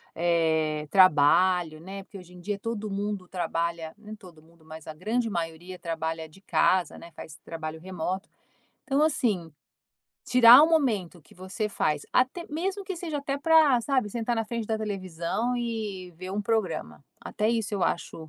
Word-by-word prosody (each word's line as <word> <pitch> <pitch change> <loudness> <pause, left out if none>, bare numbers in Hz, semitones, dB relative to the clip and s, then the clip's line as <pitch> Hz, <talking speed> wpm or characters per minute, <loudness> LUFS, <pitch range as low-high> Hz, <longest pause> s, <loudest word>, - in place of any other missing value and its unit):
eh, 160 -3 +1
trabalho, 175 -1 +4
né, 195 +2 -8
porque 200 0 -12
hoje 180 0 -15
em 180 - -13
dia 200 +1 -3
todo 220 -1 -4
mundo 200 -2 -3
trabalha 170 -2 -3
nem 215 0 -10
todo 175 -7 -16
mundo, 165 0 -23
mas 160 0 -11
a 155 - -6
grande 225 +8 -1
maioria 175 0 -5
trabalha 160 -1 -4
de 175 - -18
casa, 185 -4 +1
né, 170 - -12
faz 160 0 -10
trabalho 160 -1 -6
remoto. 185 +2 -4 0.6
Então, 275 +1 +1
assim, 210 - 0 0.7
tirar 250 +1 +9
um 320 - +5
momento 210 - 0
que - - -21
você 190 +4 -4
faz, 150 -7 -1
até 260 +7 +1
mesmo 380 +6 -2
que 380 -2 -5
seja 320 -4 -4
até 280 0 -3
pra, 310 -5 +5
sabe, 255 -5 0
sentar 235 +1 -1
na 225 - 0
frente 230 0 -4
da 220 - 0
televisão 195 +3 -2
e 215 -6 -4
ver 185 +1 -7
um 210 - -2
programa, 210 -5 -2 0.2
até 215 +1 -2
isso 225 -3 -1
eu 195 - -2
acho 160 -1 -2
190 Hz, 170 wpm, -27 LUFS, 170-230 Hz, 0.7 s, tirar